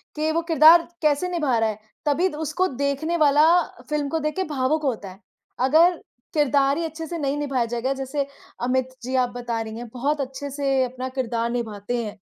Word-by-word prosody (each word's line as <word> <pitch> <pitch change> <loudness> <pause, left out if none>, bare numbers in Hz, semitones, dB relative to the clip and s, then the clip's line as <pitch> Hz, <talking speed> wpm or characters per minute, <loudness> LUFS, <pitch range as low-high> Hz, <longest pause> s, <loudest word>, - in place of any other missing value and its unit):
कि 310 +1 0
वो 330 - +1
किरदार 325 +1 +7
कैसे 300 +3 +2
निभा 300 -9 +1
रहा 225 0 +2
है? 215 0 -5 0.3
तभी 300 +5 +2
द 295 - -8
उसको 320 +4 0
देखने 280 +5 -1
वाला 300 0 +5 0.4
फ़िल्म 295 -2 -1
को 325 - -1
देख़ 305 0 -2
के 380 - 0
भावुक 295 +1 0
होता 225 -8 -2
है। 185 - -15 0.5
अगर 335 +5 +5 0.4
किरदार 285 -2 +3
ही 335 - -1
अच्छे 320 0 -6
से 340 - -4
नहीं 285 -1 -1
निभाया 275 -5 0
जाएगा 240 +3 -1
जैसे 270 +1 -3 0.4
अमित 260 +1 0
जी 260 +1 -3
आप 250 -1 +2
बता 235 -2 -3
रही 220 0 -6
हैं 240 0 -7
बहुत 285 +4 -1
अच्छे 270 +2 -5
से 275 -2 +1
अपना 255 +1 -4
किरदार 235 -3 -2
निभाते 235 0 -3
हैं। 210 0 -7
275 Hz, 200 wpm, -23 LUFS, 245-305 Hz, 0.5 s, किरदार